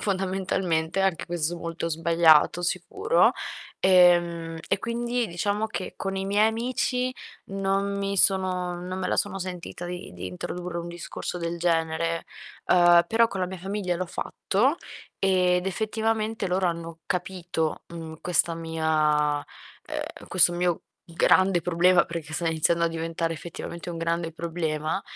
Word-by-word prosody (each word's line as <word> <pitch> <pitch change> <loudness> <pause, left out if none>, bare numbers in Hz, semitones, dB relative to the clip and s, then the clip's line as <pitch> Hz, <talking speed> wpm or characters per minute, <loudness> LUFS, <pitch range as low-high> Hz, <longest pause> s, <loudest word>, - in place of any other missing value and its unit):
fondamentalmente; 190 -3 -1
anche 190 -4 +1
questo 170 0 -1
molto 165 0 -4
sbagliato, 165 0 +4
sicuro. 390 - +2 0.5
Ehm, 175 -3 +4
e 195 - +2
quindi 235 +1 -1
diciamo 205 +5 -1
che 205 -4 -5
con 195 0 -3
i 190 - -2
miei 205 +2 +4
amici 250 +2 -1 0.3
non 195 0 -1
mi 200 0 -2
sono 185 -2 +2
non 185 +1 -5
me 185 - -2
la - - +1
sono 200 -1 -1
sentita 180 -1 -6
di 180 0 -6
di 90 +1 -6
introdurre 170 - -5
un 170 - -5
discorso 175 +1 -6
del 170 0 -3
genere, 165 -1 0 0.4
uhm, 175 -1 +6
però 230 +1 +3
con 195 - -4
la 180 - +1
mia 185 +1 -7
famiglia 190 0 -2
l'ho 185 +1 -3
fatto 245 - 0 0.4
ed, 180 -2 +2
effettivamente, 220 +1 -1
loro 185 0 +1
hanno 165 -1 -4
capito, 175 -3 -2
mhmm, 160 -1 -7
questa 170 -1 +1
mia 155 -2 +1
uhm, - - -9
questo 180 -1 +4
mio 175 -1 0 0.3
grande 175 +2 +3
problema, 180 +1 +4
perché 165 -2 -6
sto 170 +1 -2
iniziando 165 +1 +2
a 170 - +3
diventare 165 0 -2
effettivamente 170 +1 -7
un 170 - -5
grande 165 0 -1
problema, 160 0 -2
175 Hz, 145 wpm, -26 LUFS, 165-195 Hz, 0.5 s, uhm